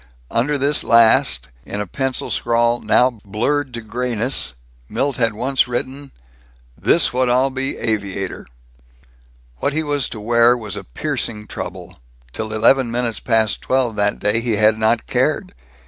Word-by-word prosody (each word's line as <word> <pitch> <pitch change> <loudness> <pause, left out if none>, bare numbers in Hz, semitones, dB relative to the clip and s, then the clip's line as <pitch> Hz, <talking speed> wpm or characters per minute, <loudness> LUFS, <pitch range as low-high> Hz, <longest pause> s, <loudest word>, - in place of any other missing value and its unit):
Under 145 +5 +1
this 140 +2 +2
last, 110 - +4
in 105 - -6
a 105 - -2
pencil 135 +6 -3
scrawl 120 0 +1
now 125 -2 +2
blurred 130 +7 -1
to 115 - -5
grayness, 120 - -2 0.3
Milt 140 0 -1
had 115 -3 +1
once 130 +5 0
written, 130 +3 -4 0.6
"This - - +3
what 130 0 +1
Ill 130 +2 +3
be 135 +1 -3
aviator." 100 -4 -3 1.1
What 140 - 0
he 160 +1 0
was 145 -3 -1
to 110 - -7
wear 115 +2 +3
was 110 -5 -5
a - - -6
piercing 105 - -3
trouble. - - -8 0.3
Till 110 0 -4
eleven 115 +4 +3
minutes 120 -1 -2
past 110 -3 +1
twelve 130 -4 0
that 105 0 +1
day 105 +2 +1
he 115 -1 -1
had 110 +1 +3
not 110 +1 +2
cared. - - 0
120 Hz, 150 wpm, -19 LUFS, 110-130 Hz, 1.1 s, last